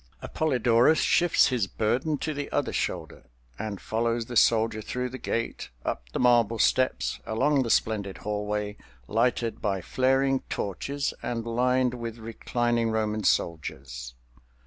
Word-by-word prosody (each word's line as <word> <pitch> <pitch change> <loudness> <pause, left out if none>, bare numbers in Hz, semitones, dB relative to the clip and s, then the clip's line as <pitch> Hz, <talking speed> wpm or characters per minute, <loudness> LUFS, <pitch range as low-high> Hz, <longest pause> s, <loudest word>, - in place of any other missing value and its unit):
Appolidorus 125 -1 +3
shifts 175 -4 +4
his 120 -6 0
burden 125 +10 0
to 155 +2 -3
the 145 0 -5
other - - 0
shoulder, - - -3 0.3
and 105 -3 -4
follows 115 +1 -1
the 120 - -7
soldier 110 -1 +3
through 125 +3 -3
the 130 +1 -8
gate, 115 0 -3 0.2
up - - -3
the - - -3
marble 120 -2 +4
steps, 130 +3 +1
along 135 +6 +2
the 120 - -2
splendid 100 -4 +1
hallway, 105 0 -3 0.3
lighted 115 0 0
by 100 -3 0
flaring 135 +6 +2
torches 140 +9 -2
and 115 -1 -3
lined 125 +2 +1
with 115 -2 -5
reclining 115 +1 -1
Roman 110 -1 -1
soldiers. 70 -8 -2
115 Hz, 135 wpm, -27 LUFS, 110-125 Hz, 0.3 s, shifts